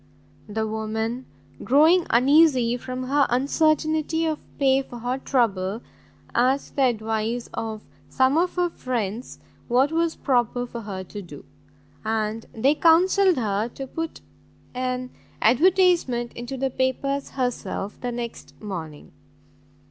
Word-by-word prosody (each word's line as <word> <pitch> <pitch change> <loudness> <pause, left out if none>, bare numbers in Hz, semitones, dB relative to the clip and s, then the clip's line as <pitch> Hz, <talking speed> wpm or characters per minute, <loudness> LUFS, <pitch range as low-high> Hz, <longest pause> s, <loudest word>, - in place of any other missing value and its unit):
The 220 +1 -1
woman, 220 +3 -3 0.4
growing 320 +7 +5
uneasy 260 -1 +4
from 255 +1 -5
her 280 +2 +2
uncertainty 310 +4 +1
of 315 -2 -1 0.2
pay 270 -1 +3
for 245 -2 -10
her 245 +3 -2
trouble, 220 -5 0 0.5
asked 260 +3 +1
the 275 - +3
advice 225 0 -1
of 220 -1 -4 0.3
some 260 - +2
of 355 +2 +1
her 355 -1 +1
friends 235 -4 -4 0.3
what 260 +4 +3
was 330 0 0
proper 245 -2 0
for 235 -1 -7
her 195 -3 -6
to 205 +3 -8
do; 150 -6 -12 0.6
and 220 0 -2
they 265 +6 +2
counselled 360 +3 +4
her 215 -2 0
to 270 - -5
put 325 +4 -5 0.5
an 255 0 -3 0.3
advertisement 290 - +3
into 240 +3 -6
the 265 0 -1
papers 275 +2 -1
herself 245 -5 -3
the 245 - -2
next 235 -1 -7
morning. 165 -8 -7
250 Hz, 125 wpm, -24 LUFS, 225-285 Hz, 0.6 s, growing